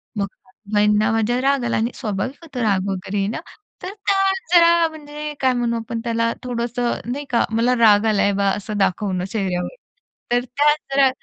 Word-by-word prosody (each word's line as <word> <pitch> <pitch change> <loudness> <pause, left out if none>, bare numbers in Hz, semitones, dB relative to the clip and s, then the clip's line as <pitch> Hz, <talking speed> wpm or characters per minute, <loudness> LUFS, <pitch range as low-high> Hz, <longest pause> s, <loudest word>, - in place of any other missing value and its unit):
मग 200 - 0
सासूबाईंना 210 +2 0
माझ्या 225 +2 +1
राग 275 -1 +2
आला 235 - 0
आणि 230 +3 0
स्वाभाविक 225 +3 -3
होतं 280 -6 -6
राग 200 -3 +1
वगैरे 195 +1 -3
येणं. 205 +4 -2 0.4
तर 375 +2 -5
त्या 400 -1 0 0.4
जरा 335 -1 +6
म्हणजे 300 -1 -7
काय 260 -1 +3
म्हणू 235 -1 0
आपण 230 0 -4
त्याला 230 0 0
थोडंसं, 240 0 -2 0.2
नाही 285 +3 -4
का, 235 - +2
मला 235 +3 +2
राग 215 -2 +5
आलाय 205 -2 +2
बा 200 0 +1
असं 210 +1 -5
दाखवणं 185 -1 0
चेहऱ्यावर. 190 - -3 0.6
तर 245 0 +2
त्या 290 +4 +3 0.2
जरा 275 -1 +5
230 Hz, 170 wpm, -21 LUFS, 205-265 Hz, 0.6 s, जरा